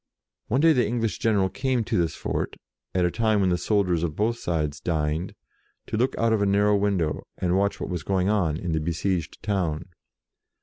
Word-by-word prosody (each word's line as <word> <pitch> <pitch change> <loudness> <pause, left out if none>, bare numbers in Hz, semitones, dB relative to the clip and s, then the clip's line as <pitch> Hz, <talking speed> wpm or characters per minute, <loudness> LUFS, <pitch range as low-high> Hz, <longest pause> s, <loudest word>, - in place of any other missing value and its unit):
One 130 +5 +1
day 165 0 +6
the 125 -4 +3
English 115 -4 -1
general 105 -4 +2
came 130 +3 -1
to - - -2
this 85 -2 +1
fort, - - -3 0.4
at 90 - +3
the 90 - +2
time 110 -1 +2
when 95 -2 +3
the - - +3
soldiers 95 -6 +1
of 80 -3 -2
both 115 +3 0
sides 75 -3 -2
dined, 80 +1 -1 0.5
to - - -4
look 125 +4 +1
out 115 0 +2
of 110 - +1
a 100 - +2
narrow 105 +1 +3
window, 100 -6 0 0.2
and 90 0 0
watch 100 +1 +1
what - - -4
was 90 -3 -2
going 95 +2 0
on 90 -8 +1
in 85 0 -3
the 80 - +1
be 80 +2 -2
sieged 85 -2 -2
town. 90 -6 -1
95 Hz, 210 wpm, -25 LUFS, 85-110 Hz, 0.5 s, day